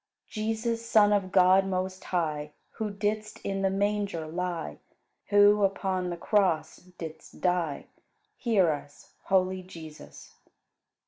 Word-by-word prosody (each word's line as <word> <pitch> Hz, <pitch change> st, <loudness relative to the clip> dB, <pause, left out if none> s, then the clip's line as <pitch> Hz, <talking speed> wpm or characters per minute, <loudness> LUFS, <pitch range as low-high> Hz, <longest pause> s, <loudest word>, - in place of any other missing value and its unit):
Jesus, 225 Hz, +1 st, -2 dB
Son 215 Hz, -3 st, +4 dB
of 195 Hz, -2 st, 0 dB
God 185 Hz, 0 st, +6 dB
most 185 Hz, 0 st, -3 dB
high, 150 Hz, -4 st, -2 dB, 0.2 s
Who 220 Hz, -1 st, -3 dB
didst 210 Hz, +1 st, -2 dB
in 195 Hz, 0 st, -2 dB
the 195 Hz, -, +2 dB
manger 200 Hz, -3 st, -1 dB
lie, 170 Hz, -, -4 dB, 0.5 s
Who 205 Hz, 0 st, +5 dB
upon 190 Hz, -2 st, 0 dB
the 175 Hz, -, -4 dB
cross 190 Hz, -4 st, +1 dB
didst 165 Hz, -3 st, -11 dB
die 175 Hz, -5 st, 0 dB, 0.5 s
Hear 200 Hz, -9 st, +2 dB
us, 145 Hz, -1 st, -8 dB
holy 185 Hz, -1 st, +2 dB
Jesus! 160 Hz, -4 st, -12 dB
190 Hz, 120 wpm, -28 LUFS, 175-205 Hz, 0.5 s, God